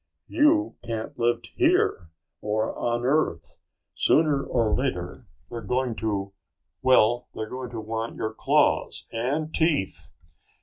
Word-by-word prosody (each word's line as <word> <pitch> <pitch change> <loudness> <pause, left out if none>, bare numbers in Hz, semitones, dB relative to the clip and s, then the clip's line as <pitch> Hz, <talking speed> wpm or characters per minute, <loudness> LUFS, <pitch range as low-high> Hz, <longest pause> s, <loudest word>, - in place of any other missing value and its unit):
"You 315 +2 +2
can't 115 +1 -5
live 120 0 +1
here 85 - +2 0.3
or 110 +1 -1
on 120 0 -1
Earth. 150 +4 0 0.4
Sooner 150 -3 +3
or 115 -4 +1
later 90 -10 -3 0.2
they're 115 - -5
going 125 +3 -1
to 100 -3 -2 0.5
well, 120 -2 +4
they're 110 - -4
going 125 +1 -6
to 120 -2 -6
want 110 +1 -4
your 110 0 -3
claws - - +1
and 145 +7 -2
teeth. 160 - 0
120 Hz, 125 wpm, -25 LUFS, 110-135 Hz, 0.5 s, well